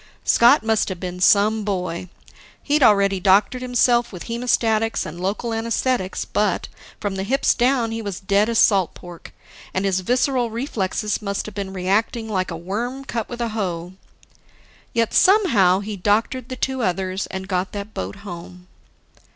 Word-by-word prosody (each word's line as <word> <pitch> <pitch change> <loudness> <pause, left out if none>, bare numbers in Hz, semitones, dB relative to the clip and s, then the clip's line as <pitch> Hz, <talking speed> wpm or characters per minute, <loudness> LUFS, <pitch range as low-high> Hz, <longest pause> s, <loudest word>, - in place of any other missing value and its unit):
Scott 240 +2 +5
must 220 -2 +1
have 185 -2 -5
been 180 0 -5
some 215 +3 +4
boy. 180 -3 -3 0.5
He'd 295 +1 +1
already 200 -5 +4
doctored 200 +6 +3
himself 245 -1 +2
with 180 -4 -8
hemostatics 230 -2 0
and 170 +3 -8
local 210 +5 -2
anaesthetics 225 -2 -1
but, 205 -4 0 0.3
from 200 -2 -3
the 190 - -2
hips 265 +7 +2
down, 245 -2 +1
he 225 0 -3
was 200 -4 -5
dead 200 +3 +2
as 230 - 0
salt 195 -6 +3
pork, 175 -1 -11 0.4
and 190 +1 0
his 190 -1 +1
visceral 250 +4 +1
reflexes 215 -4 -2
must 200 -1 -3
have 215 - -8
been 195 -1 -5
reacting 205 +5 -1
like 185 -4 -1
a 165 - -5
worm 235 +10 -4
cut 230 -4 -4
with 240 0 -6
a 235 - -1
hoe. 180 -5 -4 1.0
Yet 230 -1 0
somehow, 230 - +4
he 205 0 -5
doctored 225 +6 0
the 255 - -4
two 265 0 -2
others 185 -1 -1
and 190 0 -6
got 185 -1 -1
that 205 +1 -6
boat - - -5
home. 180 0 -9
210 Hz, 165 wpm, -21 LUFS, 190-235 Hz, 1.0 s, Scott